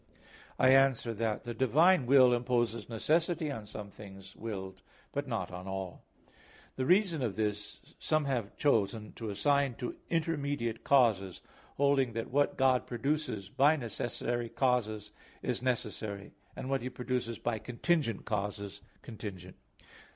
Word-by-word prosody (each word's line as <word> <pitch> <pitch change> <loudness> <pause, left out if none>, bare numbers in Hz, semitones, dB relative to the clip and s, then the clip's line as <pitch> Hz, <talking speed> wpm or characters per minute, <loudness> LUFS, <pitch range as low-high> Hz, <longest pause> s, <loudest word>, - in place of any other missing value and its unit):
I 130 - +5
answer 135 -3 +4
that, 110 -1 -2
The 120 - -4
divine 140 +5 +4
will 130 -2 +7
imposes 120 -1 0
necessity 160 +6 +1
on 110 -6 -6
some 105 -1 -8
things 95 -2 -12
willed 95 -4 -6 0.3
but 145 0 -3
not 110 -8 -3
on 90 +1 -7
all. 95 -2 -5 0.7
The 130 0 -1
reason 180 -4 +3
of 115 -6 -1
this 105 -1 -2 0.2
some 155 -1 +1
have 120 -7 -2
chosen 110 -5 +1
to 115 -2 -6
assign 140 +5 +1
to 125 - -5
intermediate 145 -8 -1
causes, 110 -9 +3 0.4
holding 140 -3 +3
that 115 +1 -4
what 145 +2 +2
God 130 -2 +3
produces 125 -5 -2
by 145 +8 +4
necessary 120 -1 -3
causes 110 -6 0 0.3
is 125 -2 -1
necessary; 110 -5 -3 0.2
and - - -6
what 135 0 0
He 125 - -3
produces 125 -2 -3
by 115 -2 -2
contingent 125 - -1
causes 100 -2 -3 0.2
contingent. 95 -5 -8
120 Hz, 135 wpm, -31 LUFS, 105-135 Hz, 0.7 s, will